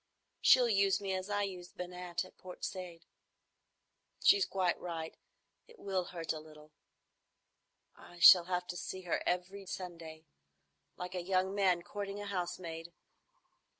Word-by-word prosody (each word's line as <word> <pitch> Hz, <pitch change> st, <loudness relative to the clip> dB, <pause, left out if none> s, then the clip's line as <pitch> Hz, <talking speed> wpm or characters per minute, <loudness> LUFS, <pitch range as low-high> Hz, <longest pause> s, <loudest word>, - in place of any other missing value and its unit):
She'll 250 Hz, -2 st, +7 dB
use 195 Hz, -3 st, +3 dB
me 195 Hz, -2 st, -3 dB
as 185 Hz, +1 st, -3 dB
I 205 Hz, 0 st, +1 dB
used 180 Hz, -3 st, -7 dB
Binat 180 Hz, 0 st, -4 dB
at -, -, -16 dB
Port 185 Hz, -1 st, -8 dB
Said. 180 Hz, -3 st, -7 dB, 1.2 s
She's 400 Hz, -1 st, +6 dB
quite 185 Hz, -2 st, 0 dB
right. 165 Hz, -2 st, -5 dB, 0.5 s
It 470 Hz, 0 st, -17 dB
will 190 Hz, -, -2 dB
hurt 170 Hz, -2 st, -4 dB
a 155 Hz, -, -6 dB
little. 155 Hz, 0 st, -15 dB, 1.2 s
I 175 Hz, -, -15 dB
shall 175 Hz, +1 st, +9 dB
have 180 Hz, 0 st, -1 dB
to 175 Hz, -, -4 dB
see 185 Hz, +2 st, -5 dB
her 180 Hz, -2 st, -1 dB
every 190 Hz, +2 st, -2 dB
Sunday,—like 160 Hz, -, -10 dB
a 180 Hz, -, -2 dB
young 185 Hz, +1 st, +1 dB
man 185 Hz, -4 st, +2 dB
courting 200 Hz, +1 st, -5 dB
a 205 Hz, -, -5 dB
housemaid. 175 Hz, -3 st, -4 dB
180 Hz, 140 wpm, -34 LUFS, 170-195 Hz, 1.2 s, shall